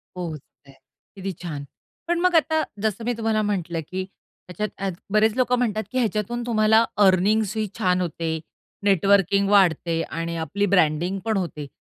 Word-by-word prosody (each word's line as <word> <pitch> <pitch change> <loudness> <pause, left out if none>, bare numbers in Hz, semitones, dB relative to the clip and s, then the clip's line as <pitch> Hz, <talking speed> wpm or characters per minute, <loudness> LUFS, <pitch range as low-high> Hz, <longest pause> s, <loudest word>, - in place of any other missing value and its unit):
पोहोचतंय, 155 -5 -8 0.4
किती 195 0 -4
छान! 150 -5 -5 0.4
पण 345 0 +1
मग 365 0 +2
आता 315 0 +3 0.2
जसं 220 +1 -1
मी 245 - +1
तुम्हाला 220 -1 +1
म्हटलं, 180 -5 -2
की 185 +1 -3 0.5
ह्याच्यात 195 0 -3 0.2
बरेच 215 +1 +4
लोकं 250 -1 +2
म्हणतात, 220 -3 0
की 255 - -3
ह्याच्यातून 235 +1 -1
तुम्हाला 220 -1 +4 0.2
अर्निन्ग्स 200 +3 +3
ही 215 -1 0
छान 185 -3 +2
होते, 165 -1 -2 0.4
नेटवर्किंग 200 0 +3
वाढते 170 -4 +3
आणि 165 +1 -4
आपली 200 +5 -1
ब्रँडिंगपण 185 +4 +1
होते. 155 -6 -4
200 Hz, 140 wpm, -23 LUFS, 175-220 Hz, 0.5 s, बरेच